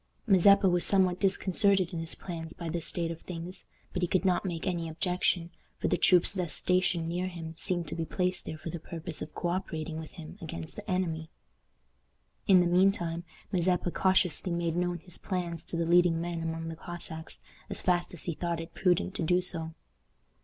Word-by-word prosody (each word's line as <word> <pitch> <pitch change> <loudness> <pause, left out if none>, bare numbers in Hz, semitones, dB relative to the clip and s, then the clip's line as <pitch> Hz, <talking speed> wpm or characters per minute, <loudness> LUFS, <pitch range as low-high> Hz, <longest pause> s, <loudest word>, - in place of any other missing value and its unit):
Mazeppa 200 -1 +6
was 175 -1 +3
somewhat 185 -2 +4
disconcerted 195 -1 +3
in 170 - -2
his 165 0 +1
plans 165 -3 -6
by 170 -1 -6
this 170 0 0
state 170 -1 -1
of 165 - -7
things; 180 +1 -7 0.3
but 180 - -2
he 175 - +2
could 185 +2 +1
not 185 -2 +2
make 170 -2 -4
any 170 -3 -1
objection, 175 +1 0 0.3
for - - -1
the - - +3
troops 180 -2 +5
thus 180 -5 -2
stationed 180 -2 +2
near 180 +2 -1
him 165 -3 -7
seemed 175 0 -1
to - - -4
be 165 - -2
placed 180 +3 0
there 155 - -5
for 160 +1 -6
the 170 - -5
purpose 165 0 -6
of 155 - -7
co 175 - -1
operating 160 -3 -3
with 160 - -9
him 165 +4 -10
against 85 - -7
the 210 +1 -9
enemy. 165 -4 -1 1.2
In 185 -2 +7
the - - +2
mean 180 +3 +5
time, 170 -2 -4 0.3
Mazeppa 180 -1 +1
cautiously 185 -1 +2
made 170 -1 -1
known 175 0 0
his 175 +1 -9
plans 170 -3 -3
to 170 - -2
the 170 - +1
leading 170 0 +4
men 170 0 -3
among 165 0 -3
the 165 - -5
Cossacks 160 -1 -4 0.3
as - - -1
fast 175 -1 +1
as 165 - -5
he 170 - -2
thought 170 +1 -2
it 165 +1 -8
prudent 180 0 +1
to - - -4
do 180 +3 +3
so. 165 -3 -1
175 Hz, 205 wpm, -30 LUFS, 165-180 Hz, 1.2 s, In